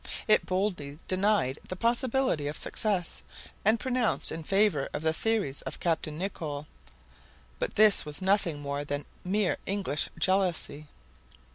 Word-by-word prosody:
It 215 - +4
boldly 185 -7 -1
denied 190 -8 +1
the 185 - -4
possibility 235 - +1
of 150 - -3
success, 195 -6 -2 0.4
and 220 +3 +4
pronounced 255 -2 0
in 165 - -4
favor 195 -5 +2
of 150 - -4
the 160 0 +2
theories 205 -8 -1
of - - -6
Captain 160 -3 -1
Nicholl. 155 -6 -4 0.9
But - - -2
this 215 -1 +6
was 150 -1 -2
nothing 185 -6 +1
more 140 0 -3
than 145 0 -3 0.2
mere 195 +1 +1
English 190 -7 0
jealousy. 180 -6 +1
185 Hz, 135 wpm, -29 LUFS, 150-210 Hz, 0.9 s, this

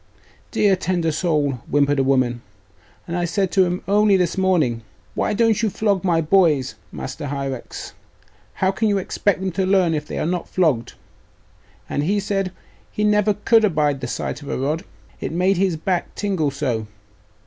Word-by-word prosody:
'Dear 200 -2 +3
tender 175 -3 0
soul,' 150 -5 0
whimpered 145 0 +2
a - - +3
woman; 130 -3 +1 0.7
'and 170 - -3
I 175 - 0
said 190 +1 0
to 190 -2 +4
him 180 +1 -3
only 205 0 +4
this 175 -2 0
morning, 170 -12 +1 0.3
why 210 - 0
don't 225 -1 +3
you 220 - +2
flog 200 -2 0
my 170 -3 +2
boys, 155 -6 +3 0.2
Master 145 - -6
Hierax? 135 -2 -5 0.6
how 190 0 +1
can 220 +3 0
you 205 -1 +2
expect 195 +1 0
them 190 0 -1
to 190 +3 -1
learn 185 -3 +3
if 150 -1 -3
they - - -5
are - - -1
not 175 +1 -2
flogged? 145 -11 +1 0.9
And 145 - -1
he 195 +7 +1
said, 195 -1 -1 0.4
he 210 - -2
never 210 0 +3
could 220 +2 +3
abide 150 -8 +1
the 125 - -3
sight 120 +5 -4
of 145 - -9
a - - -2
rod, 150 +5 -2 0.3
it - - -4
made 180 +3 +2
his 185 -3 +1
back 180 +2 -2
tingle 190 -8 0
so. 130 -6 -2
175 Hz, 180 wpm, -21 LUFS, 145-195 Hz, 0.9 s, to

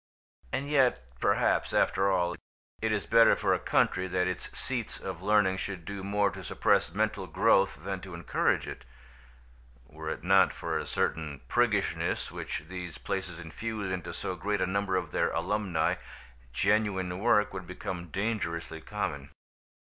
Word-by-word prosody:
And 140 +2 -2
yet 135 - +3 0.2
perhaps, - - +2
after 95 +1 +3
all, 90 -2 +1 0.5
it 110 0 +1
is 105 -2 0
better 115 0 +6
for - - +2
a - - +1
country 95 - +2
that 90 0 +1
its 90 -1 -3
seats - - -3
of - - -6
learning 105 -3 +3
should 95 -3 -5
do 100 -1 -5
more 100 +1 +2
to 95 -2 -8
suppress 85 - +2
mental 105 0 -1
growth 95 -6 +3
than 95 -1 -3
to 95 -2 -8
encourage 85 - +1
it. - - -7 1.0
Were 80 +4 -7
it - - -4
not 95 +1 +5
for - - -2
a - - -5
certain 75 -4 -1
priggishness 105 - +1
which - - -4
these 90 -3 -6
places 95 0 -3
infuse 100 +4 -4
into 90 -2 -3
so 95 - -4
great 100 +3 -1
a - - +2
number 95 0 0
of 90 -5 -1
their - - +2
alumni, 100 -6 0 0.5
genuine 95 - +1
work 105 -2 +3
would 95 -2 -6
become 90 0 -5
dangerously 85 -4 -2
common. 75 -8 -4
95 Hz, 155 wpm, -30 LUFS, 85-105 Hz, 1.0 s, better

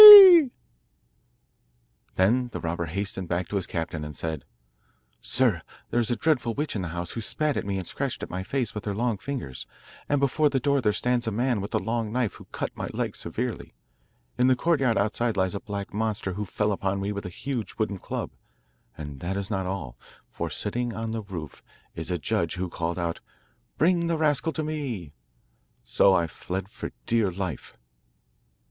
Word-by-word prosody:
Then 120 +7 +3
the - - -3
robber 85 +1 -2
hastened 95 +2 -3
back 85 0 -1
to - - -3
his 95 -3 0
captain 80 -1 -3
and 75 -1 -6
said: 80 -5 -3 0.7
'Sir, 120 -8 +2 0.3
there 120 - +2
is 115 - +1
a 120 - +2
dreadful 125 -6 +1
witch 150 -2 -2
in 100 - -1
the 90 - -3
house, 85 +1 -4
who 115 - -4
spat 150 +6 0
at - - -2
me 100 -1 -1
and 95 - -3
scratched 135 +5 -3
my 90 - -4
face 120 +3 -1
with 105 - -5
her 100 -2 -1
long 115 -2 0
fingers; 125 - -5 0.4
and 145 - +3
before 145 +2 +3
the 135 -1 +1
door 140 +1 +2
there 105 -3 +3
stands 120 +2 0
a - - +1
man 120 0 +1
with 100 - -4
a - - +5
long 115 +2 -1
knife, 120 -5 0
who - - -13
cut - - -4
my - - -4
leg - - -2
severely. - - -4 0.6
In 125 - +5
the 130 - +5
courtyard 135 -5 +2
outside 110 +2 +1
lies 95 0 +2
a 100 - -2
black 100 -1 -5
monster, 105 -3 -1
who 105 +3 -3
fell 105 +3 0
upon 95 0 -1
me 100 +1 -1
with 100 -2 -4
a - - -4
huge 120 +3 -4
wooden 100 -3 -1
club; - - -4 0.7
and 75 -3 -7
that 95 +6 -2
is 100 +2 -3
not 95 -2 -1
all, 65 -11 -5 0.3
for, - - -3
sitting 120 -1 -2
on 115 0 -3
the 115 0 -2
roof, 90 -8 -7 0.3
is 80 +1 -4
a 90 - 0
judge, 75 - 0
who 90 0 -2
called 85 +1 -2
out: 85 -2 -2 0.6
"Bring 170 +1 +3
the 165 -1 +1
rascal 155 0 +2
to 155 - -2
me." 130 - -4 0.7
So 95 - +4
I 85 - +3
fled 95 +3 -5
for - - -6
dear 115 - +2
life. 90 -5 -5
105 Hz, 190 wpm, -27 LUFS, 90-125 Hz, 0.7 s, a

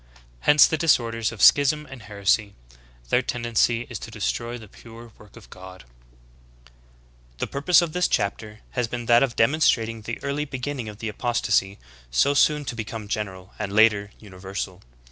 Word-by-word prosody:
Hence 150 - +6
the 160 - -1
disorders 115 -8 +1
of 110 -4 -4
schism 150 +2 +5
and 135 -2 -11
heresy. 100 0 0 0.5
Their - - +3
tendency 120 -1 0
is - - -7
to - - -9
destroy 115 - -3
the 110 -2 -12
pure 115 +3 -14
work 105 -2 -17
of - - -15
God."^ 95 0 -12 0.8
2L - - -29
The - - -2
purpose 155 +5 +3
of 160 -2 -4
this 180 0 +1
chapter 105 +2 -2
has 125 -2 -1
been 120 0 -5
that 120 0 +5
of 135 -4 0
demon 140 +8 +2
strating 115 -6 +1
the 115 - -4
early 140 +2 -2
beginning 130 -3 -5
of 105 - -10
the 110 - -5
apostasy, 105 -3 0 0.3
so 135 - +2
soon 150 +1 +2
to 120 - -5
be 115 - -3
come 110 -1 -8
general, 95 -3 -5
and 100 - -3
later, 105 -1 +3
universal. 95 -1 -7
115 Hz, 175 wpm, -24 LUFS, 100-125 Hz, 0.8 s, Hence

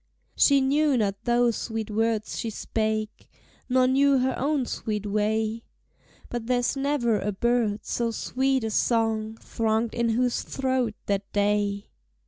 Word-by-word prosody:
She 280 -1 +5
knew 285 +1 +2
not 200 -3 -1
those 240 -1 +3
sweet 220 -2 -4
words 220 0 0
she 230 - -3
spake. 215 0 -3 0.4
Nor 255 0 +4
knew 275 +2 +4
her 260 0 +1
own 280 -1 0
sweet 210 -3 -3
way; 215 +2 0 0.6
But 240 -2 -5
there's 245 +1 +1
never 270 -6 +1
a 210 - -2
bird, 225 0 0
so 235 -1 -1
sweet 260 +3 0
a 220 - -2
song 225 -1 0
Thronged 225 0 -1
in 235 -1 0
whose 245 +2 +1
throat 260 -4 -1
that 200 0 -2
day! 205 0 0
230 Hz, 140 wpm, -26 LUFS, 215-255 Hz, 0.6 s, She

